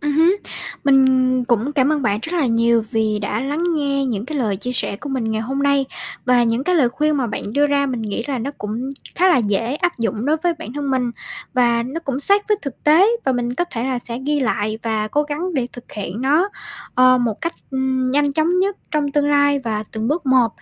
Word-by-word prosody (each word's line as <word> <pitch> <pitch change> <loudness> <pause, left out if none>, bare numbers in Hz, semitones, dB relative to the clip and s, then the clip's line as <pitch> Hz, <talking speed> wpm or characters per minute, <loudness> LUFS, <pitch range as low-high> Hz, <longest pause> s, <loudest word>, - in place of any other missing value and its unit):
Ừm 295 0 -1
hứm. 330 +6 +4 0.5
Mình 270 -1 +5 0.4
cũng 240 +3 0
cảm 280 0 +2
ơn 300 -2 0
bạn 205 -4 +1
rất 330 - -5
là 325 -6 +2
nhiều 230 -1 +2
vì 220 -1 0
đã 210 +1 -2
lắng 290 +6 -2
nghe 280 -2 0
những 220 -5 -2
cái 300 +1 -3
lời 215 -6 0
chia 250 +6 -4
sẻ 235 - -1
của 285 - -8
mình 250 -5 -2
ngày 220 0 -1
hôm 270 +5 -2
nay. 280 -1 +3 0.4
Và 250 -1 +4
những 235 +3 0
cái 365 - +2
lời 285 -8 +4
khuyên 300 +4 0
mà 260 -3 0
bạn 210 -1 -5
đưa 290 +4 +3
ra 285 -1 +1
mình 250 -4 -3
nghĩ 215 +1 -3
là 275 -3 -2
nó 250 +5 -3
cũng 225 +6 -4 0.2
khá 370 +2 +4
là 355 - +5
dễ 230 +3 0
áp 350 -1 -1
dụng 225 -1 -1
đối 305 +2 +3
với 340 +2 0
bản 325 -7 -7
thân 285 0 -3
mình, 250 -2 0 0.4
và 235 -2 +3
nó 270 +7 -5
cũng 275 -5 -3
sát 400 +8 +3
với 420 - +3
thực 275 -4 -7
tế. 320 +7 +6 0.2
Và 265 - +2
mình 245 0 -2
có 350 - 0
thể 235 +1 -2
là 260 -2 -1
sẽ 235 0 -6
ghi 295 0 +1
lại 215 -4 -1
và 220 -2 -1
cố 295 +7 +1
gắng 305 +5 -4
để 255 -4 0
thực 245 - -12
hiện 210 +1 -5
nó, 305 +9 +3 0.5
ờ, 255 0 +5
một 235 -4 -1
cách, 335 +1 -2 0.2
ừm, 260 -1 0
nhanh 285 +1 +2
chóng 320 +5 +1
nhất 390 +1 +1
trong 295 -2 0
tương 290 0 +2
lai 285 0 +3
và 220 -5 -3
từng 220 0 -2
bước 305 +1 -1
một 255 -3 +4
265 Hz, 245 wpm, -20 LUFS, 235-295 Hz, 0.5 s, tế